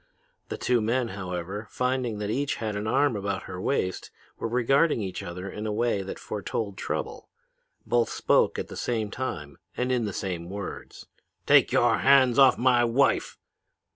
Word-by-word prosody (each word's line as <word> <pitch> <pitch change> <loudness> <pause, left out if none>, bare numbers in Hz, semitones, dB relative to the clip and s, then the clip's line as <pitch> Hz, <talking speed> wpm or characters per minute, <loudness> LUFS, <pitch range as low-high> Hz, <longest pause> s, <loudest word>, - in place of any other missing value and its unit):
The - - -4
two 125 -2 +1
men, 115 +2 0
however, 95 +1 -5
finding 125 -3 -1
that 105 0 -3
each 140 +4 -1
had 110 -2 -4
an 105 +1 -3
arm 135 +2 +2
about 100 -1 -3
her 90 0 -7
waist, 95 -6 -1 0.3
were - - -2
regarding 125 +6 +2
each 95 -2 -5
other 90 +2 -6
in 105 +2 -5
a - - -1
way 110 -1 0
that 95 - -6
foretold 105 0 -4
trouble. - - -5 0.6
Both 120 -1 +2
spoke - - +2
at - - -3
the - - -9
same 110 -4 -2
time 75 - -5 0.2
and 125 +1 0
in 125 -3 +1
the 105 - -3
same 90 -3 -4
words. 100 0 -7 0.4
"'Take - - +5
your - - +3
hands 135 -2 +5
off 135 -2 +7
my 120 -1 +4
wife!' 120 +4 +1
110 Hz, 170 wpm, -26 LUFS, 100-125 Hz, 0.6 s, off